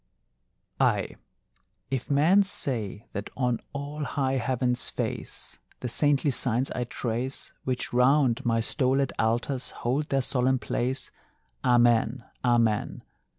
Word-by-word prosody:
Ay, - - +1 0.8
if 130 -3 -2
men 155 +8 +5
say 120 - 0
that 100 +1 -4
on 125 -3 0
all 145 +2 -5
high 135 -2 -1
heaven's 125 0 0
face - - -5 0.2
The 125 - -2
saintly 145 +3 +2
signs 125 0 +2
I 125 - -2
trace 120 +2 -3
Which 125 -2 -2
round 130 0 +3
my 115 -1 +1
stolèd 135 +2 +1
altars 120 +4 0 0.2
hold 140 +5 0
their 135 -1 +1
solemn 130 +1 +1
place, 130 +2 -2 0.5
Amen, 120 0 +3 0.2
amen! 115 -3 +1
125 Hz, 115 wpm, -27 LUFS, 120-135 Hz, 0.8 s, men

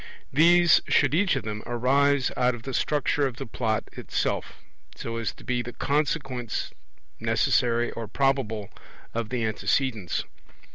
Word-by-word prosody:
These 170 +3 +6
should 145 -1 +3
each 185 +3 +3
of - - -2
them 105 0 -4
arise 135 +3 +2
out 125 0 +2
of 115 - -11
the 135 - -5
structure 145 +1 +1
of 130 - -6
the - - -6
Plot 110 -1 -1
itself, - - -2 0.4
so 115 0 -5
as 115 -1 -2
to - - -16
be 125 -1 -1
the 120 0 -7
consequence, 140 -5 -1 0.5
necessary 120 0 +2
or 115 -1 -6
probable, 125 -7 0 0.4
of 115 -1 -2
the 120 -2 -1
antecedents. 110 -1 0
125 Hz, 145 wpm, -26 LUFS, 115-140 Hz, 0.5 s, These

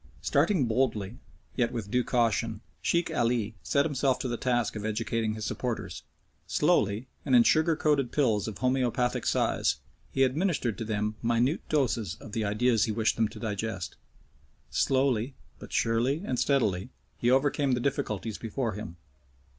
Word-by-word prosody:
Starting 180 -11 +2
boldly, 115 -3 0 0.4
yet 120 -2 +1
with 110 -4 -5
due 125 0 +2
caution, 115 -3 0 0.2
Sheikh 170 -1 +1
Ali 115 -3 +1
set 140 0 +2
himself 135 -4 +1
to 130 - -3
the 120 - -1
task 120 -2 0
of 105 - -4
educating 110 0 -1
his 110 -1 -5
supporters. 125 -3 -3 0.5
Slowly, 105 +5 +2 0.2
and 130 -3 +3
in 120 - +8
sugar 160 +5 +3
coated 145 -5 +1
pills 115 -9 +1
of 110 -3 -5
homeopathic 125 -1 0
size, - - +2 0.4
he 135 - +2
administered 135 - +1
to 115 - -3
them 105 0 -2
minute 120 +6 +1
doses 115 - 0
of 110 - -12
the 110 +1 -1
ideas 110 +2 +2
he 110 - -2
wished 110 0 +1
them 115 -1 +2
to - - -11
digest. 100 -4 -3 0.8
Slowly, 130 -2 +1 0.2
but - - -11
surely 120 - +1
and 125 - -1
steadily, 110 -8 +1 0.3
he 120 - +2
overcame 135 +1 +2
the 125 - +1
difficulties 120 -5 -2
before 115 +1 -2
him. 90 -4 -7
120 Hz, 155 wpm, -28 LUFS, 110-135 Hz, 0.8 s, in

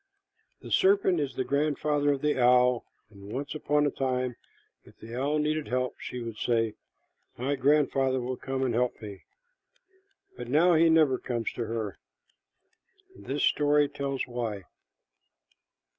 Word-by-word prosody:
The - - -10
serpent 380 - +3
is 140 -2 -3
the 130 - -1
grandfather 145 +1 +1
of 135 - -5
the 150 -3 +1
owl, 125 0 +4 0.3
and 100 0 -12
once 140 +3 -4
upon 150 -1 +1
a 145 - +1
time 130 -2 -2 0.5
if - - -19
the 115 +1 -11
owl 140 +4 0
needed 155 0 -1
help, 125 0 -2
she 125 -1 -6
would 115 -2 -7
say, 115 -1 0 0.6
"My 130 +4 -1
grandfather 135 -1 +2
will 125 +1 -3
come 135 +1 -3
and 125 -3 0
help 125 +1 0
me," 100 -3 -10 1.1
but - - -7
now 165 +7 +4
he 165 +1 +5
never 155 -5 +4
comes 120 -2 -3
to 120 - -3
her. 110 -4 -4 1.2
This 140 +2 -4
story 145 0 +3
tells 140 -1 -3
why. 115 -5 -4
130 Hz, 145 wpm, -28 LUFS, 120-145 Hz, 1.2 s, he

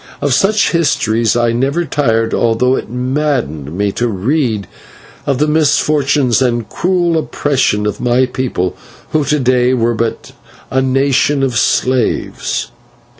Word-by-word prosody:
Of 140 -2 0
such 200 +8 +2
histories 115 -9 +1
I 120 -1 +2
never 135 +8 0
tired, 115 -6 0
although 120 +3 +2
it - - -5
maddened 125 - -2
me 100 0 0
to 120 +4 -1
read 110 0 -1 0.6
of 140 -2 +1
the 150 - +2
misfortunes 145 -4 +2
and 120 -4 0
cruel 175 - 0
oppression 135 -9 0
of 105 -1 -3
my 125 +1 +2
people, 125 -8 -3 0.4
who 155 -1 +1
to 150 +1 +1
day 125 0 +2
were 120 -1 +1
but 115 0 -3 0.4
a 130 +2 +2
nation 135 +1 +1
of 130 -3 -1
slaves. 125 0 0
130 Hz, 135 wpm, -15 LUFS, 115-145 Hz, 0.6 s, such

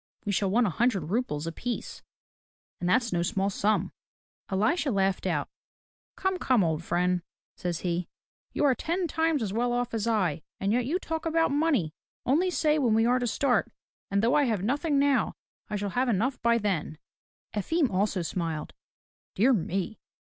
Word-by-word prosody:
We 205 - 0
shall 195 0 +1
want 235 +5 +3
a 195 - 0
hundred 195 -6 0
roubles 195 -10 -1
apiece, 230 +9 -4 0.4
— - - -78
and 175 - -1
that's 235 +1 +2
no 170 - +1
small 195 +2 0
sum." 200 -1 +1 0.6
Elisha 275 - +1
laughed 195 -4 +1
out. - - 0 0.7
"Come, 380 -1 -1
come, 250 -6 +3
old 160 -1 -1
friend," 180 +1 +1 0.3
says 175 -2 -3
he, 175 -1 -1 0.4
"you - - 0
are 275 - +5
ten 345 +8 -1
times 320 -4 +1
as 200 -2 -3
well 240 +2 +1
off 245 0 -1
as 225 0 -1
I, 185 -10 +1 0.2
and 195 +1 0
yet 245 0 +1
you 330 +6 +1
talk 325 -3 -4
about 325 -1 +2
money! 280 - +1 0.3
Only 325 +9 +3
say 310 -3 +2
when 240 -6 +3
we 225 +1 +4
are 250 +2 +3
to 245 - -1
start, 245 0 +1 0.4
and 200 +1 +1
though 235 - +3
I 295 -1 +4
have 215 -6 0
nothing 285 - +1
now, 275 -5 +2 0.3
I 210 - -2
shall 205 -1 -2
have 250 +3 +1
enough 240 +5 0
by 235 0 +4
then." 185 -8 -2 0.6
Efim 280 - +1
also 190 -1 0
smiled. 165 -2 -3 0.6
"Dear 245 +7 +4
me 195 +1 -2
225 Hz, 180 wpm, -28 LUFS, 190-270 Hz, 0.7 s, are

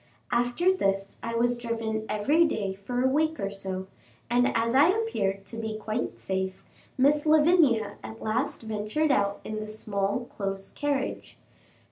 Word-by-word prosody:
After 245 +10 +2
this 195 - -1
I 230 0 -3
was 240 +1 +2
driven 225 -2 -3
every 285 +11 +3
day 205 -11 -1
for 245 +6 -3
a - - +4
week 310 +4 +1
or 200 0 -2
so, 190 -1 -5 0.5
and 245 +1 +4
as 230 +1 +1
I 280 +4 +7
appeared 210 - 0
to 225 - -8
be 220 -1 -3
quite 220 +2 -3
safe, 190 0 -3 0.3
Miss 290 +3 +4
Lavinia 295 - +4
at 110 0 -8
last 230 +4 -1
ventured 220 +8 0
out 200 -5 +1
in 215 0 -4
the 215 - -5
small 210 +1 -2
close 195 -1 -4
carriage. 285 -2 -2
225 Hz, 155 wpm, -27 LUFS, 200-270 Hz, 0.5 s, I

